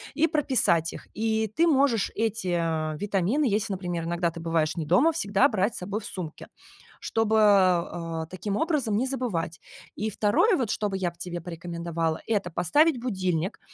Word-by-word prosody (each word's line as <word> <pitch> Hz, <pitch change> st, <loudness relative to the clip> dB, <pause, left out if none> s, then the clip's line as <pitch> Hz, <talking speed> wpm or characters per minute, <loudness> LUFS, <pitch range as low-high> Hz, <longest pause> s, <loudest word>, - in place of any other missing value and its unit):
и 310 Hz, +3 st, +3 dB
прописать 250 Hz, -, +2 dB
их. -, -, -10 dB
И 220 Hz, 0 st, 0 dB
ты 325 Hz, -, +1 dB
можешь 270 Hz, -8 st, +2 dB
эти, 215 Hz, -5 st, -1 dB
а, 160 Hz, -2 st, -1 dB
витамины, 205 Hz, -, 0 dB
если, 215 Hz, -2 st, +1 dB
например, 175 Hz, -3 st, -3 dB
иногда 170 Hz, 0 st, 0 dB
ты 170 Hz, -, -9 dB
бываешь 165 Hz, -1 st, 0 dB
не 160 Hz, -, -2 dB
дома, 220 Hz, -, +4 dB
всегда 210 Hz, -4 st, +2 dB
брать 210 Hz, 0 st, 0 dB
с -, -, -4 dB
собой 200 Hz, +4 st, -3 dB
в 205 Hz, -, -10 dB
сумке, 170 Hz, -5 st, -7 dB, 0.5 s
чтобы, 220 Hz, -1 st, 0 dB
а, 175 Hz, -5 st, +2 dB
таким 195 Hz, +3 st, -3 dB
образом 280 Hz, -10 st, 0 dB
не 250 Hz, -, +1 dB
забывать. 205 Hz, -11 st, -3 dB, 0.4 s
И 215 Hz, -, -2 dB
2 215 Hz, -, +2 dB
вот, 240 Hz, -7 st, -1 dB
что 210 Hz, -2 st, -1 dB
бы 195 Hz, -, -3 dB
я 180 Hz, -2 st, -1 dB
б 170 Hz, -, -26 dB
тебе 175 Hz, -1 st, -5 dB
порекомендовала,- 170 Hz, -1 st, -3 dB
это 205 Hz, -5 st, 0 dB
поставить 255 Hz, -, +3 dB
будильник. 185 Hz, -7 st, -2 dB
195 Hz, 175 wpm, -26 LUFS, 170-225 Hz, 0.5 s, дома